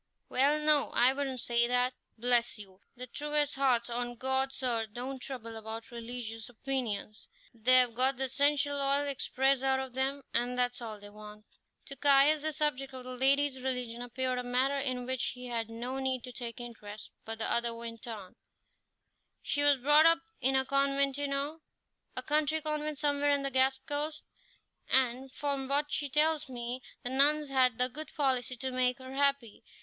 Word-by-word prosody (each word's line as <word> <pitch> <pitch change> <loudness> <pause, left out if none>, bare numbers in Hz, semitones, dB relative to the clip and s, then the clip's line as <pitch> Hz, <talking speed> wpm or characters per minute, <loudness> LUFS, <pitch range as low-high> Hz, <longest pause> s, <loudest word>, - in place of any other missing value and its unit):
"Well, 280 +4 +3
no, 300 -1 +3
I 250 +2 +5
wouldn't 270 -3 -3
say 235 0 +2
that. 250 +1 +2 0.2
Bless 240 0 +2
you! 195 -3 -12 0.2
the 250 - -6
truest 295 +3 -1
hearts 255 -4 +2
on 240 0 -3
God's 265 +2 -1
earth 225 -4 -1
don't 260 +3 -5
trouble 235 -4 -7
about 220 +1 -7
religious 235 -1 -6
opinions; 235 -4 -3 0.3
they 240 +3 +4
have 250 -2 +5
got 260 +2 +2
the 265 - -1
essential 285 +2 +1
oil 280 +1 +2
expressed 270 -1 +1
out 265 0 +2
of 265 -2 -5
them, 270 +2 -1
and 245 +1 +1
that's 245 0 0
all 220 -3 -6
they 205 0 -12
want." 210 0 -12 0.4
To 275 - -8
Caius 285 +2 +5
this 310 -1 -2
subject 275 -3 -1
of 255 - -8
the 255 0 -5
lady's 270 +1 +2
religion 250 -2 -3
appeared 255 +1 -2
a - - -3
matter 260 +3 +1
in 255 -2 -2
which 260 -1 -2
he 250 0 -9
had 230 -2 -3
no 245 +4 -4
need 260 -2 -1
to 250 - -8
take 240 0 -6
interest, 215 -3 -9
but 225 0 -6
the 225 - -3
other 235 0 0
went 230 0 -8
on: 205 -5 -8 1.1
"She 290 - 0
was 290 -1 +5
brought 295 +5 +6
up 330 0 +4 0.2
in 265 +1 +2
a 265 0 +3
convent, 275 0 +1
you 285 - 0
know 285 +3 -3 0.5
a - - -2
country 305 +1 +1
convent 305 -1 -3
somewhere 290 0 +1
on 285 -1 +2
the 275 - -2
Gaspé 265 +1 +2
coast, 300 +2 -2 0.7
and, 260 0 +2
from 280 -1 -2
what 290 +2 0
she 290 -2 -1
tells 305 +1 +2
me, 245 0 -4 0.2
the 245 - -3
nuns 290 +2 +3
had 255 -3 +3
the 250 0 +3
good 300 +5 -7
policy 260 -3 +1
to 260 +2 -4
make 250 -1 +1
her 260 0 -10
happy. 275 -5 0
260 Hz, 185 wpm, -31 LUFS, 240-280 Hz, 1.1 s, brought